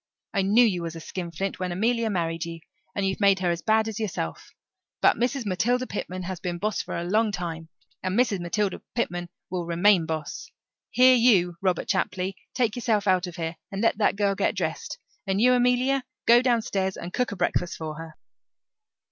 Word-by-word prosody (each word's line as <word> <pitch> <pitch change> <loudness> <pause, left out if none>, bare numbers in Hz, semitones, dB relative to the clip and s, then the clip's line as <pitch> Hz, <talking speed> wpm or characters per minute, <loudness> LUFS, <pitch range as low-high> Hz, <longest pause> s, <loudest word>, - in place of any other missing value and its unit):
I 200 - +2
knew 210 +6 +5
you 185 -6 0
was 165 -1 -5
a - - -6
skinflint 175 +3 -4
when 185 -1 -2
Amelia 230 +5 +1
married 165 -4 -1
you, 165 -1 -7 0.3
and 200 - 0
you've 190 0 -1
made 200 -2 +5
her 180 -2 0
as 170 - -3
bad 220 0 +2
as 220 0 -4
yourself. 165 - -4 0.4
But - - +5
Mrs. 245 +2 -1
Matilda 240 +7 +1
Pitman 185 -5 -5
has 185 0 -5
been 175 -1 -3
boss 210 +1 -1
for - - -5
a 170 - -3
long 210 +5 +2
time, 165 -4 -5 0.3
and 185 +2 -1
Mrs. 240 -6 +2
Matilda 190 +3 -1
Pitman 175 -7 -2 0.2
will 175 -2 -3
remain 175 0 +4
boss. 155 -2 -4 0.4
Here 255 +1 +6
you, 200 -8 +4
Robert 185 -2 0
Chapley, 185 +1 -1 0.2
take 235 -4 +1
yourself 225 -4 0
out 185 -2 +2
of 175 - -8
here 165 -1 -4
and 195 +2 -3
let 225 - +2
that 205 - +3
girl 200 -1 +1
get 195 +1 0
dressed. 165 -4 -3 0.3
And 190 0 +1
you, 250 +3 +5
Amelia, 250 +2 +2 0.2
go 235 +1 +7
downstairs 220 -6 0
and 175 +2 -7
cook 250 -3 0
a - - -4
breakfast 175 -1 -1
for 155 -1 -5
her." 160 -1 -9
195 Hz, 195 wpm, -26 LUFS, 175-220 Hz, 0.4 s, go